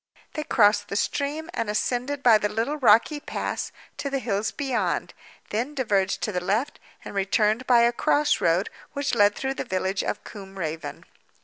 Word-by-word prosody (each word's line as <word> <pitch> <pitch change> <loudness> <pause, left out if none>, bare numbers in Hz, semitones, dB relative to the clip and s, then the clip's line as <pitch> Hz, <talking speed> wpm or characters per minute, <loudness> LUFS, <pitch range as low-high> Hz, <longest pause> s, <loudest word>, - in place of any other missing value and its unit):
They 305 - -3
crossed 205 -6 +3
the 200 - -5
stream, 300 +9 -2
and 230 - -2
ascended 250 +6 -1
by 225 -3 +7
the 210 - 0
little 230 +8 -1
rocky 245 +3 +4
pass 290 - -4 0.3
to 280 - -3
the 275 - -1
hills 215 -4 -1
beyond; 270 -4 -2 0.4
then 245 +8 -2
diverged 200 -7 +1
to 215 - 0
the 180 -2 -2
left, 215 +10 -1 0.3
and - - -7
returned 210 +4 +1
by 240 -2 +6
a 235 0 +4
cross 295 +4 +2
road 170 +4 +2 0.2
which 285 -1 -2
led 205 -3 +4
through 265 0 -2
the - - -4
village 190 +1 -1
of - - -3
Combe 195 -2 -10
Raven. 160 -3 -5
225 Hz, 180 wpm, -25 LUFS, 205-275 Hz, 0.4 s, by